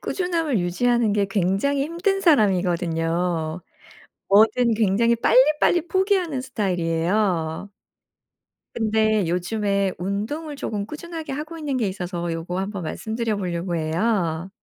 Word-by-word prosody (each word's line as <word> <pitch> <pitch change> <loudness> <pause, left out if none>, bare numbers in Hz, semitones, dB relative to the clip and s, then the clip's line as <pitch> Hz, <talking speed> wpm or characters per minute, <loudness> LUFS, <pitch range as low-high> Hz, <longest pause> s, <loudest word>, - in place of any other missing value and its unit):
꾸준함을 335 - -1
유지하는 225 +5 +1
게 205 -1 +2
굉장히 195 +9 0
힘든 360 +5 -1
사람이거든요. 175 - +1 0.7
뭐든 225 +4 +4
굉장히 220 +2 +2
빨리빨리 300 +8 +3
포기하는 375 -8 +1
스타일이에요. 180 -5 -1 1.0
근데 220 -3 +1
요즘에 195 +2 0
운동을 220 - -4
쪼금 205 -6 -3
꾸준하게 320 +3 -7
하고 305 +4 -5
있는 290 -4 -2
게 225 - 0
있어서 180 -2 -4
요거 170 +3 -4
한번 195 -1 -4
말씀드려 220 +6 -3
보려고 175 -2 -3
해요. 170 +1 -1
210 Hz, 305 characters per minute, -23 LUFS, 180-265 Hz, 1.0 s, 뭐든